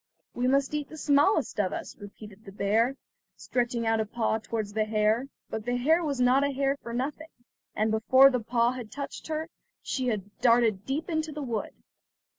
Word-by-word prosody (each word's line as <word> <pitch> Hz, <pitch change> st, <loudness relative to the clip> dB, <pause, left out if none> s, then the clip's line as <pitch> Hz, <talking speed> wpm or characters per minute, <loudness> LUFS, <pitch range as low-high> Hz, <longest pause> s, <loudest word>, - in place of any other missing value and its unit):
"We 245 Hz, +1 st, 0 dB
must 275 Hz, +2 st, +2 dB
eat 295 Hz, -1 st, -3 dB
the 315 Hz, -, -10 dB
smallest 285 Hz, -3 st, +2 dB
of 190 Hz, -3 st, +1 dB
us," -, -, -6 dB
repeated 205 Hz, 0 st, -12 dB
the 195 Hz, -, -11 dB
bear, 220 Hz, +7 st, +1 dB, 0.4 s
stretching 240 Hz, -1 st, -2 dB
out 225 Hz, 0 st, +2 dB
a 220 Hz, -, 0 dB
paw 220 Hz, 0 st, -1 dB
towards 215 Hz, -1 st, -4 dB
the 215 Hz, 0 st, +1 dB
hare; 215 Hz, +4 st, +1 dB, 0.2 s
but 220 Hz, -, -5 dB
the 245 Hz, +2 st, -1 dB
hare 320 Hz, +7 st, +3 dB
was 285 Hz, -5 st, -2 dB
not 250 Hz, +2 st, +4 dB
a 285 Hz, -, +1 dB
hare 275 Hz, 0 st, 0 dB
for 235 Hz, -, -7 dB
nothing, 280 Hz, +6 st, -3 dB, 0.5 s
and 215 Hz, +1 st, +1 dB
before 260 Hz, +5 st, +6 dB
the 250 Hz, -, 0 dB
paw 235 Hz, +1 st, +1 dB
had 245 Hz, -4 st, -7 dB
touched 280 Hz, -1 st, -7 dB
her, 315 Hz, 0 st, -3 dB, 0.4 s
she 260 Hz, -2 st, -2 dB
had 205 Hz, -3 st, -3 dB
darted 230 Hz, -5 st, +3 dB
deep 285 Hz, +4 st, -2 dB
into 315 Hz, -2 st, -2 dB
the 300 Hz, -1 st, -5 dB
wood. 230 Hz, -5 st, -3 dB
245 Hz, 195 wpm, -28 LUFS, 220-275 Hz, 0.5 s, before